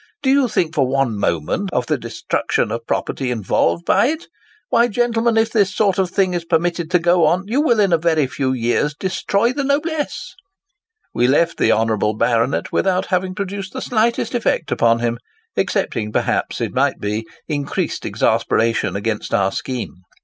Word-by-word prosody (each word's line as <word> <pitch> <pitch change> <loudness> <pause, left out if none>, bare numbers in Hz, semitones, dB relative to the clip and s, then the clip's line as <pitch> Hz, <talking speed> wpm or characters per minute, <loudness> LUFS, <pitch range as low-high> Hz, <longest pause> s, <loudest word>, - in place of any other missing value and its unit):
Do 265 - +3
you 275 -2 +4
think 170 -7 0
for 140 -5 +2
one 135 -3 0
moment 100 - -1
of 125 -5 0
the - - 0
destruction - - -2
of - - -5
property 130 - -2
involved 95 -7 0
by - - +3
it? 315 +3 -3 0.4
Why, 235 +1 +4
gentlemen, 235 0 +1
if 225 0 +2
this 200 -4 +1
sort 200 -3 +2
of 185 -2 +1
thing 190 0 +1
be 175 - 0
permitted 170 0 0
to 180 - +4
go 175 -1 +3
on, 175 +4 +1
you 245 +8 +1
will 240 -8 +2
in 195 -4 +3
a 165 - +4
very 160 -3 +2
few 130 0 -2
years 130 +4 0
destroy 200 +6 0
the 285 +1 -2
noblesse!' 310 +5 -2 0.8
We 120 - +2
left 165 +6 +2
the 115 - +3
honourable 110 -1 +1
baronet 115 +3 0
without 185 0 +1
having 185 0 0
produced 200 -1 -5
the 260 - -4
slightest 235 +1 0
effect 230 -8 0
upon 115 0 +2
him, 120 0 -1 0.4
excepting 105 -1 -1
perhaps, - - -1
it - - -2
might - - +1
be, 105 +2 -2 0.2
increased 145 -2 -2
exasperation 110 -4 +1
against 105 +1 -2
our 95 -1 +2
scheme. 125 -8 -5
170 Hz, 175 wpm, -19 LUFS, -, 0.8 s, you